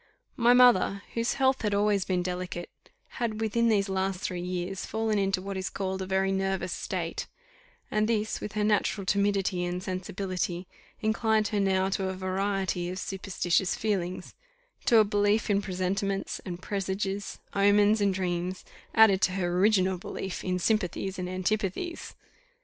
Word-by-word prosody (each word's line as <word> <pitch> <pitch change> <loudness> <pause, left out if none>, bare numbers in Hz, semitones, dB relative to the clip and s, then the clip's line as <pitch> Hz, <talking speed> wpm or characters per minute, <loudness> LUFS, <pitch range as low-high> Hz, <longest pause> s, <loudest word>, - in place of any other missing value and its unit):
My 240 0 +5
mother, 240 -5 +5
whose 230 0 0
health 265 -1 +2
had 210 -2 0
always 205 -1 +2
been 180 -2 0
delicate, 180 -1 -4 0.5
had 220 -2 -1
within 230 +1 +2
these 205 -3 +3
three 195 - -4
last 190 -1 -1
years 180 +1 -3
fallen 220 -1 0
into 195 -1 0
what 195 0 -4
is 190 0 -2
called 190 -1 -3
a 190 - -4
very 190 0 +1
nervous 190 -2 -1
state, - - -3 0.6
and 215 0 +2
this, 220 -1 -1
with 210 - -5
her 210 0 0
natural 210 -1 +1
timidity 195 -2 +1
and 180 +1 -3
sensibility, 185 -1 -3 0.4
inclined 220 -1 +2
her 210 -1 0
now 190 -1 +2
to 190 -1 -1
a 190 - -3
variety 185 -1 -1
of 185 - -5
superstitious 190 -1 0
feelings 185 -4 -2 0.5
to 235 - +5
a 220 - +8
belief 205 +1 +1
in 200 0 +3
presentiments 195 +1 -2
and 180 0 -6
presages, 195 0 -3 0.2
omens 205 +2 +4
and 200 -2 +2
dreams, 180 0 -2 0.3
added 215 -4 +6
to 190 - +2
her 175 -2 -1
original 190 -2 +3
belief 190 +1 -5
in 180 -1 0
sympathies 190 -1 -1
and 180 0 -3
antipathies. 200 - -2
195 Hz, 155 wpm, -28 LUFS, 185-210 Hz, 0.6 s, a